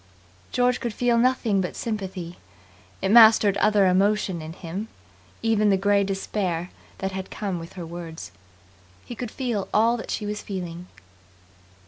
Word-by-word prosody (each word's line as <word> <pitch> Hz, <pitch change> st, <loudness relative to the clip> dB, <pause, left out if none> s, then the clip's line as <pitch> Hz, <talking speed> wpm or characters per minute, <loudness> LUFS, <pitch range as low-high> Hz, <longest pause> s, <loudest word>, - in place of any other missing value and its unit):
George 245 Hz, 0 st, +2 dB
could 235 Hz, -3 st, -4 dB
feel 245 Hz, -1 st, +2 dB
nothing 235 Hz, -4 st, +2 dB
but 180 Hz, -, -4 dB
sympathy. 190 Hz, -6 st, -5 dB, 0.6 s
It 190 Hz, -, +1 dB
mastered 220 Hz, -3 st, +7 dB
other 205 Hz, -1 st, +4 dB
emotion 190 Hz, -1 st, +2 dB
in 155 Hz, +1 st, -7 dB
him, 185 Hz, +5 st, -6 dB, 0.6 s
even 215 Hz, -2 st, +3 dB
the 195 Hz, -, +4 dB
grey 200 Hz, +1 st, +3 dB
despair 190 Hz, -3 st, -2 dB, 0.3 s
that 190 Hz, 0 st, -3 dB
had 190 Hz, 0 st, -6 dB
come 190 Hz, -5 st, -4 dB
her 170 Hz, +1 st, -8 dB
words. 165 Hz, -, -8 dB, 0.7 s
He -, -, -7 dB
could 240 Hz, 0 st, -5 dB
feel 235 Hz, -6 st, -3 dB
all 230 Hz, +3 st, +3 dB
that 225 Hz, -, -8 dB
she 210 Hz, -, -2 dB
was 210 Hz, 0 st, -4 dB
feeling. 180 Hz, -3 st, -6 dB
200 Hz, 145 wpm, -24 LUFS, 180-220 Hz, 0.7 s, mastered